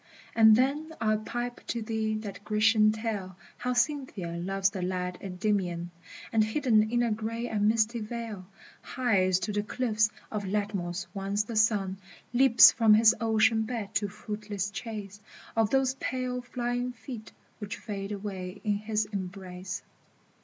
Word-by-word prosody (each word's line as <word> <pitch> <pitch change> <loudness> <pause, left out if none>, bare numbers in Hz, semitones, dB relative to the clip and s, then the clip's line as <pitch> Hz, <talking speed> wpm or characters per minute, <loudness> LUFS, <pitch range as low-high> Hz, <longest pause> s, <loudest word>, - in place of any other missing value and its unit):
And 220 -1 +8
then 290 +6 +1
I'll 215 -1 +2
pipe 240 +2 -4
to 235 -2 -2
thee 220 0 -1
that 205 -2 -6
Grecian 215 0 +4
tale 215 -4 -4 0.2
How 250 0 -1
Cynthia 245 - -1
loves 195 +3 0
the 190 -2 -5
lad 180 0 -2
Endymion, 180 -3 -1 0.4
And 220 -1 +5
hidden 220 -2 +2
in 240 +1 +2
a 235 - +1
gray 225 +2 -3
and 210 -2 +1
misty 225 +1 +2
veil 215 -4 -6 0.3
Hies 195 -8 +2
to 210 - -2
the 205 - +1
cliffs 215 -1 +1 0.2
of 210 -2 -2
Latmos 190 -3 -2
once 200 +1 -1
the 225 +2 -7
Sun 205 -3 +2 0.3
Leaps 255 -1 +8
from 220 -2 +5
his 220 0 +6
ocean 220 0 +3
bed 220 -2 -3
in 205 - -1
fruitless 210 -1 -5
chase 205 -1 -7 0.3
Of 225 -2 +3
those 265 0 +2
pale 255 -1 -3
flying 245 0 -2
feet 225 -2 -9 0.3
which 205 -2 -5
fade 200 -1 -5
away 195 -2 -5
in 210 -2 +1
his 215 0 -1
em 190 -2 -2
brace. 185 0 -7
215 Hz, 155 wpm, -29 LUFS, 195-230 Hz, 0.4 s, And